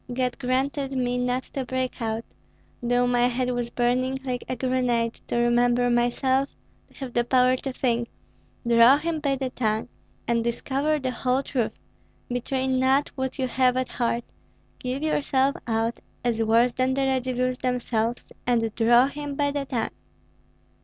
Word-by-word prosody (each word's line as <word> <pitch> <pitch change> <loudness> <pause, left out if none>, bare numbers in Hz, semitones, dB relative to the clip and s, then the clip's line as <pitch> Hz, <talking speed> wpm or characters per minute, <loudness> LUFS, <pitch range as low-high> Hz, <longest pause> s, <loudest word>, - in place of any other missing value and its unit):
God 250 0 -1
granted 270 +2 -1
me 250 -1 0
not 250 +1 0
to 270 - -2
break 255 0 -3
out, 225 0 -2 0.6
though 245 +1 +2
my 245 0 +3
head 250 +1 -1
was 245 -1 -2
burning 250 +2 0
like 250 -2 -3
a 255 - -1
grenade, 245 -2 0
to - - -1
remember 240 +1 +3
myself, 260 +3 +2 0.4
to - - -25
have 260 -3 -7
the 240 - +2
power 255 +1 +4
to 270 - -4
think: 240 -2 0 0.6
'Draw 235 +3 +7
him 320 +1 -2
by 280 -2 0
the 265 -1 -3
tongue, 220 -1 -1 0.4
and 235 0 +1
discover 275 +6 0
the 260 -3 -2
whole 255 +2 0
truth; 245 -6 -1 0.6
betray 260 +2 -1
not 260 +2 +2
what 265 0 -4
you 260 - 0
have 255 0 +2
at 255 0 -1
heart, 235 -1 -1 0.6
give 255 +3 -3
yourself 280 -3 +1
out 225 +1 0 0.3
as 230 -2 +1
worse 230 +2 +3
than 255 +1 +1
the 275 - 0
Radzivills 255 -1 0
themselves, 240 -2 -1 0.2
and 230 -3 +1
draw 240 +2 +5
him 285 0 -5
by 285 0 +1
the 285 -1 -2
tongue.'" 240 -4 -2
250 Hz, 160 wpm, -25 LUFS, 240-265 Hz, 0.6 s, Draw